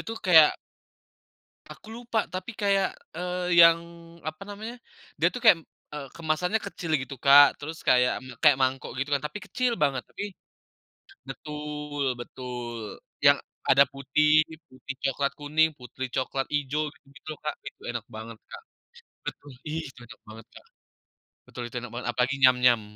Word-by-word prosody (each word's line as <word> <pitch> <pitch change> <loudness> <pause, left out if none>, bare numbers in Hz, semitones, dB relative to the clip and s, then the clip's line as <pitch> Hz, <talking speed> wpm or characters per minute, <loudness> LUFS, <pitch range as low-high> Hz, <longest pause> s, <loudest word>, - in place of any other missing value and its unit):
dia - - -6
tuh, 225 - -6
kayak 160 -4 +6 1.2
aku - - -17
lupa, 240 -1 -2 0.2
tapi 185 +3 -4
kayak, 200 -1 +2 0.3
eee, 180 0 -1
yang, 165 0 +8 0.5
apa 155 +4 -8
namanya. 215 +3 -7 0.4
Dia - - +4
tuh, 250 - -4
kayak, 220 -7 +8 0.4
eeee, 145 -2 -5
kemasannya 170 +6 0
kecil 175 -4 -6
gitu, 135 +1 -7
Kak. 140 0 +8
Terus, 160 +3 -7
kayak 125 0 +4 0.3
kayak 140 -2 +6
mangkok 130 0 0
gitu 135 +2 -2
kan, 140 - -1
tapi 150 - -7
kecil 250 +3 0
banget. 135 -3 +1
Tapi - - -6 1.0
betul 150 -1 -5
betul, 120 -3 -7 0.3
yang, - - +8 0.3
ada 140 +1 +7
putih 150 +3 +3 0.2
putih, 130 +1 -9
coklat, 140 +1 0
kuning, 155 +2 +2
putih, 125 +1 -6
coklat, 135 0 -1
hijau 145 +2 -1
gitu-gitu 140 +2 -20
loh, 155 - -9
Kak. 150 - -2
Itu, - - -10
enak 120 -2 -5
banget 110 0 -8
Kak - - -9 0.6
betul 145 - -7 0.2
itu 150 -4 -5
enak - - -14
banget 110 0 -11
Kak. - - -14 0.8
Betul, 125 - -8
itu 120 - -10
enak 125 -1 -8
banget, 120 +1 -6
apalagi 125 +3 +1
Nyam-Nyam. 125 -3 +5
145 Hz, 150 wpm, -27 LUFS, 130-165 Hz, 1.2 s, yang